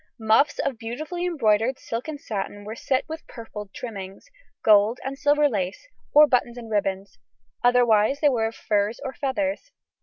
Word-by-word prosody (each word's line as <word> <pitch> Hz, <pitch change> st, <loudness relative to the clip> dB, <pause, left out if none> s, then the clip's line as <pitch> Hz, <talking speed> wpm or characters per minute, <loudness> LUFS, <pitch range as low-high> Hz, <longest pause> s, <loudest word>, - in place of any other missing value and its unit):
Muffs 225 Hz, +7 st, +3 dB
of 260 Hz, -5 st, -2 dB
beautifully 310 Hz, +10 st, -4 dB
embroidered 240 Hz, -5 st, +2 dB
silk 230 Hz, +4 st, -5 dB
and 305 Hz, -2 st, -5 dB
satin 205 Hz, -3 st, -5 dB
were 215 Hz, -, -5 dB
set 260 Hz, +2 st, -1 dB
with 320 Hz, +1 st, -8 dB
purfled 210 Hz, -3 st, -9 dB
trimmings, 195 Hz, -5 st, -8 dB, 0.4 s
gold 215 Hz, +2 st, +5 dB
and 270 Hz, +1 st, -4 dB
silver 290 Hz, +1 st, +3 dB
lace, 205 Hz, -, -3 dB, 0.2 s
or 300 Hz, +1 st, +8 dB
bows 245 Hz, -3 st, 0 dB
and 230 Hz, -2 st, -9 dB
ribbons; 195 Hz, -, -2 dB, 0.4 s
otherwise 245 Hz, +1 st, +4 dB
they 295 Hz, -, +4 dB
were 230 Hz, -4 st, +1 dB
of 225 Hz, -, -7 dB
furs 210 Hz, +1 st, 0 dB
or 265 Hz, -, -4 dB
feathers. 285 Hz, -, -2 dB
235 Hz, 160 wpm, -24 LUFS, 210-280 Hz, 0.4 s, or